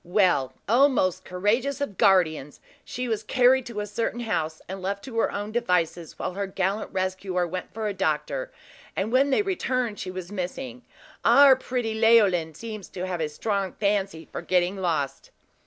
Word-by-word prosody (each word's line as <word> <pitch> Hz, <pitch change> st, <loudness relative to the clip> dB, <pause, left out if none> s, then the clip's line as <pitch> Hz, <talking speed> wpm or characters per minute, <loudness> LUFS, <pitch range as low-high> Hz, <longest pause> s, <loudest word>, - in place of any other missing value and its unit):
"Well, 175 Hz, -8 st, +2 dB
O 250 Hz, +7 st, +6 dB
most 185 Hz, -10 st, 0 dB
courageous 230 Hz, +9 st, 0 dB
of 285 Hz, -9 st, -3 dB
guardians! 160 Hz, -7 st, +3 dB, 0.2 s
she 250 Hz, 0 st, -4 dB
was 220 Hz, -3 st, -1 dB
carried 255 Hz, +2 st, +3 dB
to 220 Hz, -3 st, -4 dB
a -, -, -3 dB
certain 230 Hz, +3 st, -3 dB
house, 160 Hz, -9 st, -2 dB
and 190 Hz, +1 st, -6 dB
left 200 Hz, +2 st, -3 dB
to 235 Hz, -4 st, -4 dB
her -, -, +2 dB
own 205 Hz, +1 st, -4 dB
devices, 180 Hz, -8 st, -1 dB
while -, -, -3 dB
her 200 Hz, +1 st, -3 dB
gallant 195 Hz, +2 st, -2 dB
rescuer 185 Hz, -1 st, -1 dB
went 180 Hz, +1 st, -5 dB
for 220 Hz, 0 st, -4 dB
a 205 Hz, -, -2 dB
doctor; -, -, -1 dB, 0.4 s
and 200 Hz, +4 st, -1 dB
when 270 Hz, +3 st, +4 dB
they 345 Hz, +10 st, +3 dB
returned 255 Hz, -, -1 dB
she 185 Hz, -, -5 dB
was 185 Hz, 0 st, -7 dB
missing. 205 Hz, +7 st, -5 dB, 0.4 s
Our 280 Hz, -1 st, +7 dB
pretty 245 Hz, -3 st, -3 dB
Leoline 205 Hz, -8 st, +4 dB
seems 215 Hz, -1 st, -7 dB
to 180 Hz, 0 st, -5 dB
have 180 Hz, -3 st, -3 dB
a 155 Hz, -, -1 dB
strong 195 Hz, +4 st, -2 dB
fancy 200 Hz, -5 st, -1 dB
for -, -, -5 dB
getting 180 Hz, +1 st, +1 dB
lost!" 155 Hz, -7 st, -2 dB
200 Hz, 175 wpm, -25 LUFS, 180-235 Hz, 0.4 s, Our